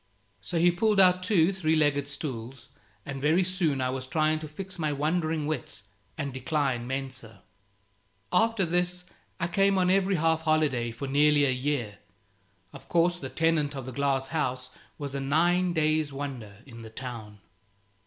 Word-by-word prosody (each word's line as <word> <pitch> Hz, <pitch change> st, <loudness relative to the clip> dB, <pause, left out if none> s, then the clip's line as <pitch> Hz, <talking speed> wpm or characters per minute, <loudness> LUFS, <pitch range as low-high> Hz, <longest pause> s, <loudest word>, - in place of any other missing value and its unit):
So 110 Hz, -, -4 dB
he 175 Hz, +2 st, +5 dB
pulled 210 Hz, +3 st, +2 dB
out 185 Hz, -1 st, +5 dB
two 185 Hz, -1 st, +3 dB
three 160 Hz, -4 st, +1 dB
legged 145 Hz, -2 st, +2 dB
stools, 135 Hz, -3 st, -6 dB, 0.4 s
and 135 Hz, -1 st, -6 dB
very 160 Hz, +6 st, +3 dB
soon 175 Hz, -7 st, 0 dB
I 130 Hz, 0 st, 0 dB
was 130 Hz, 0 st, -5 dB
trying 155 Hz, +2 st, +1 dB
to 155 Hz, -, -7 dB
fix 185 Hz, +4 st, -8 dB
my 155 Hz, -2 st, 0 dB
wandering 155 Hz, +1 st, 0 dB
wits 140 Hz, -9 st, -5 dB, 0.3 s
and 140 Hz, -3 st, -3 dB
decline 130 Hz, -3 st, -1 dB
mensa. 130 Hz, -5 st, -6 dB, 0.9 s
After 225 Hz, -3 st, +3 dB
this 180 Hz, +1 st, 0 dB, 0.3 s
I 170 Hz, -, 0 dB
came 195 Hz, +2 st, +2 dB
on 180 Hz, -1 st, +3 dB
every 195 Hz, 0 st, +2 dB
half 160 Hz, -1 st, +2 dB
holiday 155 Hz, -7 st, +1 dB
for 120 Hz, +4 st, -6 dB
nearly 145 Hz, +1 st, +4 dB
a 135 Hz, -, +2 dB
year. 125 Hz, -5 st, -2 dB, 0.7 s
Of -, -, -13 dB
course 175 Hz, +1 st, +2 dB
the -, -, -6 dB
tenant 160 Hz, -3 st, +1 dB
of 135 Hz, -2 st, -6 dB
the 130 Hz, -, -6 dB
glass 135 Hz, 0 st, 0 dB
house 130 Hz, -5 st, -2 dB, 0.3 s
was 145 Hz, -2 st, -5 dB
a 140 Hz, -, -2 dB
nine 175 Hz, +6 st, +2 dB
days' 155 Hz, -2 st, +1 dB
wonder 125 Hz, -7 st, -7 dB
in 115 Hz, -4 st, -11 dB
the 110 Hz, -, -9 dB
town. 110 Hz, -3 st, -8 dB
150 Hz, 165 wpm, -28 LUFS, 130-170 Hz, 0.9 s, he